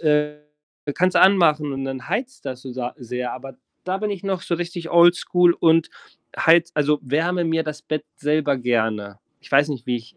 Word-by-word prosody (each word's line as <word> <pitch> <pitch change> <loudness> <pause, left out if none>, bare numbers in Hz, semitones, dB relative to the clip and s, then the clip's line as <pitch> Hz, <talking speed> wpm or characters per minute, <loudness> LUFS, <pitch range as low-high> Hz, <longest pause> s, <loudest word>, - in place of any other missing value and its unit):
äh, 150 -1 +1 0.6
kannst 185 0 +1
du - - +4
anmachen 155 -7 +4
und 135 0 -4
dann 135 -1 -6
heizt 255 +2 -4
das 130 -2 -6
so 130 - -8
sa 125 -1 -5
sehr. 125 0 -5
Aber 135 +1 -9 0.3
da 185 +1 -2
bin 210 +1 -2
ich 195 -3 -5
noch 190 -2 -2
so 170 - -2
richtig 175 0 -5
oldschool 175 0 +4
und 165 -1 +3 0.5
heize 170 +1 +4
also, 150 0 +2
wärme 165 +6 0
mir 165 0 0
das 155 -1 -7
Bett 155 -1 -4
selber 150 -1 0
gerne. 110 -5 -1 0.2
Ich - - -17
weiß 140 +2 +4
nicht, 135 -5 -6
wie 125 - 0
ich 115 -1 -12
150 Hz, 195 wpm, -22 LUFS, 130-170 Hz, 0.6 s, du